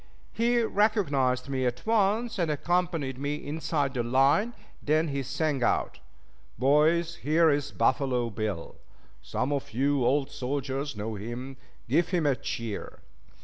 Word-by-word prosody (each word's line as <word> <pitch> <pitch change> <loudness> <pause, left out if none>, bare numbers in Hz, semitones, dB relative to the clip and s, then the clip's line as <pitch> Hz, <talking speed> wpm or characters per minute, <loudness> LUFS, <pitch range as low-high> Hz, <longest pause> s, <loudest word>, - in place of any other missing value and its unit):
He 240 +1 +2
recognized 145 - +1
me 135 -1 -1
at 125 0 -4
once, 225 +1 +1
and 170 -3 +1
accompanied 160 -4 -1
me 145 +1 -1
inside 150 -2 -2
the 125 - 0
line; 135 - +2 0.3
then 155 +2 +1
he 140 -1 -2
sang 140 +1 -1
out: - - 0 0.6
"Boys, 155 +7 +3
here's 150 -2 +2
Buffalo 125 -3 +1
Bill. 105 -5 -4 0.4
Some 135 +3 -2
of 140 -5 -4
you 140 +1 +2
old 135 +3 +1
soldiers 135 0 -3
know 105 +2 -4
him; 120 +6 -6 0.3
give 160 +8 +2
him 175 -4 0
a 140 -2 +3
cheer!" 115 -4 -5
140 Hz, 135 wpm, -28 LUFS, 130-165 Hz, 0.6 s, Boys